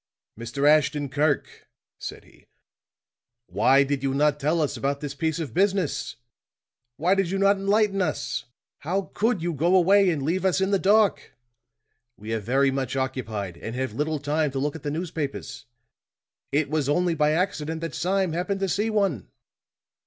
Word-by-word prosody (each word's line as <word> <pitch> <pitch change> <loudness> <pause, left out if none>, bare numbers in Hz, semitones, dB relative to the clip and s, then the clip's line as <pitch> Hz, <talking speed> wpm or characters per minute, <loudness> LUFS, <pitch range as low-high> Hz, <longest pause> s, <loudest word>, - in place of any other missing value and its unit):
"Mr. 120 +5 -1
Ashton 150 -1 +3
Kirk," 145 +1 -1 0.3
said - - -7
he, - - -23 1.0
"why 120 +9 +4
did 140 -1 -2
you 135 -1 -1
not 150 0 +2
tell 155 +4 +1
us 150 -3 0
about 140 +1 -2
this 145 -1 -5
piece 160 +2 -1
of 155 -9 -5
business? 190 -2 0 0.8
Why 175 +5 +2
did 195 -3 +1
you 195 - -1
not 200 +1 +4
enlighten 200 0 +1
us? 150 -6 -2 0.3
How 185 +5 -3
could 215 -5 0
you 175 0 -1
go 170 +6 +2
away 195 +2 +5
and 155 -5 -1
leave 175 +6 -1
us 190 0 +2
in 190 +1 0
the 195 - +3
dark? 205 +1 +2 0.8
We 110 +2 -6
are 110 - 0
very 135 +6 +2
much 135 -1 -2
occupied, 110 -9 -3
and 115 +6 -6
have 130 -3 -3
little 150 +5 -1
time 150 +2 0
to - - -3
look 145 +2 -1
at 160 - -8
the 145 - -3
newspapers. 155 -2 -5 0.9
It 145 +1 +1
was 150 -1 -1
only 175 +3 +2
by 150 -1 +2
accident 160 -3 -1
that 165 -2 -4
Sime 185 -1 0
happened 195 +3 -2
to 195 - 0
see 210 +5 0
one." 195 - 0
155 Hz, 175 wpm, -25 LUFS, 140-185 Hz, 1.0 s, away